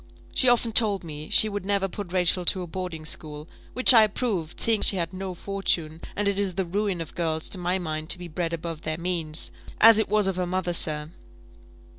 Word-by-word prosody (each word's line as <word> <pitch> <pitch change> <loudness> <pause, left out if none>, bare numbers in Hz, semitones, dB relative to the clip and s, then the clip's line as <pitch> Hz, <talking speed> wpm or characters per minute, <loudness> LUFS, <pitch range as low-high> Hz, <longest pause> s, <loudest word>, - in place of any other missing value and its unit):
She 255 - +3
often 240 -1 +1
told 210 -4 +5
me 155 -2 -9
she 220 - +7
would 205 -2 -5
never 200 0 -1
put 195 -1 -8
Rachel 180 0 +1
to 185 +1 +3
a - - -6
boarding 175 -2 -7
school, 150 -1 -4 0.3
which 255 +1 +8
I 230 - +7
approved, 205 -6 -2
seeing 225 -2 +2
she - - +6
had 170 -1 -4
no 185 -1 -7
fortune; 170 -5 -3
and 205 0 -2
it 200 0 0
is 195 -3 -1
the 190 -1 -2
ruin 195 0 -3
of 160 - -9
girls, 160 -2 -3
to 190 - -7
my 180 +1 -1
mind, 155 -3 -6
to - - +6
be 175 0 -9
bred 165 +1 -4
above 165 -1 -6
their 155 0 -5
means 170 -3 -4 0.3
as 225 0 +7
it 220 - -2
was 210 -1 +1
of 190 -1 -2
her 180 -1 -2
mother, 180 -1 -3
sir. 150 -2 -3
180 Hz, 220 wpm, -24 LUFS, 165-200 Hz, 0.3 s, which